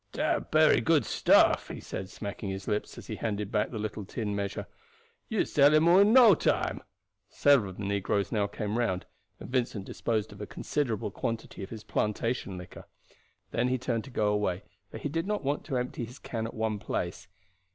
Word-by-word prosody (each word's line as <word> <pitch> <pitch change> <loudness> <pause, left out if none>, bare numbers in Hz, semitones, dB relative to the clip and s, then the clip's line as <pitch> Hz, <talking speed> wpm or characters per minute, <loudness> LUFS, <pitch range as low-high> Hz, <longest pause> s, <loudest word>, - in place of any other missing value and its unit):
"Dat - - 0
bery - - +5
good - - +3
stuff," - - +4
he - - -7
said, 95 0 -6
smacking 100 0 -6
his 95 0 -5
lips 105 -1 -2
as - - -9
he - - -5
handed 105 -2 -3
back 105 -1 +1
the 115 - -6
little 105 0 -4
tin 105 +1 -3
measure. 100 -1 -3 0.6
"You - - +1
sell 145 +1 +5
him 155 +2 +5
all 175 +3 +7
in 200 +2 +6
no 240 -4 +8
time." - - 0 0.5
Several 140 -9 +4
of 95 - -10
the 100 - -5
negroes 100 -1 0
now 105 -2 +1
came 105 +2 -3
round, 95 -6 0 0.3
and - - -8
Vincent 120 -6 -1
disposed 110 -1 -2
of 100 - -11
a 105 - -5
considerable 115 -9 -2
quantity 115 +1 -4
of 95 - -6
his 110 -2 -8
plantation 105 -2 -1
liquor. 90 -1 -10 0.6
Then 120 +2 +1
he 130 0 +1
turned 120 -3 -2
to - - -10
go 110 -4 +1
away, 100 -3 -1 0.3
for - - -8
he - - -3
did 165 +5 -2
not 210 -4 -1
want 140 +2 -1
to 135 -5 -1
empty 125 0 -3
his 125 +4 -12
can 115 -1 -4
at - - -9
one 110 -1 -1
place. 90 -1 -4
110 Hz, 205 wpm, -29 LUFS, 100-125 Hz, 0.6 s, no